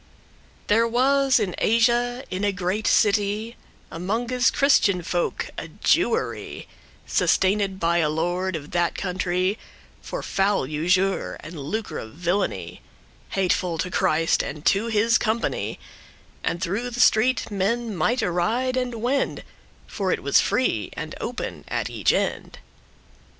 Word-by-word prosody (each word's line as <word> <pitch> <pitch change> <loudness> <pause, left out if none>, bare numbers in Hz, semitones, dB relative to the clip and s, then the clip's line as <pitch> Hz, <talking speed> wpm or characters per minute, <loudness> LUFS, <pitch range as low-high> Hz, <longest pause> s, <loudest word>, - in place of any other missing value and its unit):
There 225 +2 +3
was 270 +3 +3
in 180 - -1
Asia, 240 +2 +2
in 185 +2 -3
a 205 - +2
great 195 +3 -2
city, 210 +2 +2 0.4
Amonges 235 +8 0
Christian 200 -10 +3
folk, 175 +1 -2
a - - -6
Jewery,<5> - - 0 0.4
Sustained 195 0 +1
by 170 0 +2
a 155 -2 +2
lord 175 +4 -1
of 150 -2 -7
that 175 -1 +1
country, 185 +2 -1 0.4
For - - -5
foul 195 -6 +1
usure, 180 +7 0
and 155 0 -9
lucre 205 +11 -4
of 110 - -9
villainy, 175 +4 -2 0.6
Hateful 180 -2 +1
to 180 +3 -3
Christ, 165 -4 +2
and 150 +2 -7
to 200 +6 +3
his 225 +1 +3
company; 220 +2 -1 0.6
And 175 - -2
through 205 +7 -2
the 245 0 -6
street 245 +1 +3
men 215 +3 -1
mighte 235 +9 +1
ride 225 +9 0
and 250 -2 -1
wend,* 270 +3 +1
*go, - - -10
walk - - -25 0.3
For 195 -3 -2
it - - -1
was 140 - +4
free, 200 - 0
and - - -6
open - - -5
at - - -2
each - - +2
end. - - -2
200 Hz, 140 wpm, -24 LUFS, 175-230 Hz, 0.6 s, was